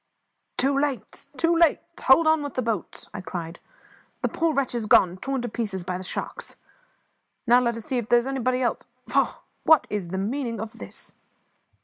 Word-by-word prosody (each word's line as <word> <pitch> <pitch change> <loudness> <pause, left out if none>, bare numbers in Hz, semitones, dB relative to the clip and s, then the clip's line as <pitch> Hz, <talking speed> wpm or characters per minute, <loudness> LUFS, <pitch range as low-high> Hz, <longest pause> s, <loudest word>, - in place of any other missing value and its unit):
"Too 275 +2 +2
late! 275 -3 -2
too 335 +4 +3
late! 335 -2 +4 0.2
hold 265 +5 +6
on 315 -1 +4
with 285 -1 -5
the 255 - 0
boat," 225 -5 -4
I 205 - -5
cried. 170 -2 -6 0.6
"The - - +2
poor 330 -1 +1
wretch 275 -4 0
is 230 -3 -2
gone; 180 -3 +5
torn 265 +4 -3
to - - -2
pieces 210 -5 -3
by 180 0 -3
the - - -7
sharks! - - -6 0.9
Now 240 +1 +6
let 235 -2 0
us 225 - -8
see 255 - 0
if 230 - -6
there 240 - +6
is 240 - +1
anybody 255 -1 0
else 240 - -1 0.2
faugh! - - +1 0.2
What 320 -3 +6
on - - -21
earth - - -19
is 205 -4 -2
the 190 +2 -4
meaning 230 +3 -2
of 220 +1 -7
this?" - - -9
240 Hz, 205 wpm, -25 LUFS, 210-275 Hz, 0.9 s, hold